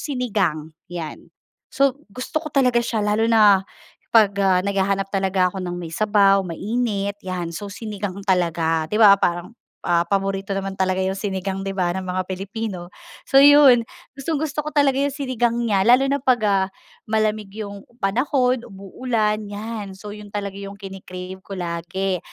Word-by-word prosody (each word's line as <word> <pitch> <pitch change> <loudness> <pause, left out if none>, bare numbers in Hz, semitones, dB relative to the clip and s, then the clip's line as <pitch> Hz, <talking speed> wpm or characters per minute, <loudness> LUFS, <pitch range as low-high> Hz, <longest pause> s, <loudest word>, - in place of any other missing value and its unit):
sinigang 195 - -1 0.2
'yan, 170 -3 -7 0.4
so 275 0 +1
gusto 255 +8 -4
ko 310 - -6
talaga 250 -4 +3
siya, 225 -3 -1
lalo 215 +2 +1
na 210 -4 +6 0.5
pag, 215 -3 +5
ah, 190 -2 +3
naghahanap 195 0 0
talaga 190 -2 +1
ako 190 - -5
ng 175 -1 -4
may 170 -2 -7
sabaw 200 0 +4
mainit 200 +2 -2
'yan, 180 -2 -4
so 200 +5 -6
sinigang 200 -2 -6
talaga 165 -3 +1
di 210 - -2
ba, 210 -3 +8
parang, 175 +4 -1 0.3
ah, 170 -1 +3
paborito 195 +1 -2
naman 195 0 -4
talaga 185 -1 0
'yung 190 0 0
sinigang 195 -1 -3
di 195 - -3
ba, 175 -2 +1
ng 190 - -3
mga 185 0 -2
Pilipino. 190 -1 -5 0.3
So 270 - +4
'yun, 280 -5 +7 0.3
gustong-gusto 300 +1 -2
ko - - -2
talaga 275 -2 +3
'yung 280 -1 0
sinigang 255 -5 0
niya 200 -3 +1
lalo 250 +2 +6
na 280 - +1
pag, 255 -3 +2
ah, 195 -2 +2 0.4
malamig 215 -1 0 0.2
'yung 200 -1 -9 0.2
panahon, 250 +3 +1
umuulan 215 +2 -2
'yan, 205 -1 -6
so 205 +2 -9
'yun 210 0 -9
talaga 200 -1 -4
'yung 200 0 -7
kini-crave 190 -2 -8
ko 195 - -6
lagi 180 +2 -2
200 Hz, 160 wpm, -22 LUFS, 190-230 Hz, 0.5 s, ba